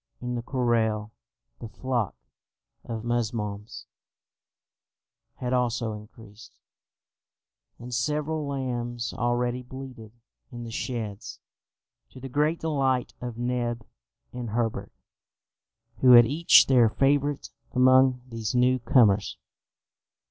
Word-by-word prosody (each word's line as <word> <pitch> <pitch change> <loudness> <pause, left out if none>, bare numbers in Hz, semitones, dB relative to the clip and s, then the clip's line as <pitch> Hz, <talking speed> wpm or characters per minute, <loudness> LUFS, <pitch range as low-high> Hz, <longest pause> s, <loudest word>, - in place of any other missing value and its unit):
In 125 0 -4
the 120 - -2
corral, 115 -4 0 0.5
the 115 - -8
flock 120 - -2 0.7
of 115 -1 -6
musmons 110 -3 -3 1.5
had 125 0 -3
also 120 -2 0
increased, 105 0 -13 1.2
and 120 +1 -9
several 150 +5 -1
lambs 120 -3 -3
already 120 0 -1
bleated 125 -3 -10 0.4
in 120 -1 -7
the 115 - -8
sheds, 110 -4 -5 0.7
to 130 - -13
the 135 +1 -8
great 150 +5 +1
delight 135 -5 0
of 120 -2 -6
Neb 120 -1 -2 0.5
and 125 -2 -5
Herbert, 115 0 -2 1.1
who 125 -1 +7
had 120 -1 +9
each 155 +8 +5
their 125 -4 +4
favourite 140 +3 0 0.2
among 130 0 +4
these 115 -1 -4
new 125 +1 +3
comers. 110 -4 +3
120 Hz, 105 wpm, -26 LUFS, 115-130 Hz, 1.5 s, had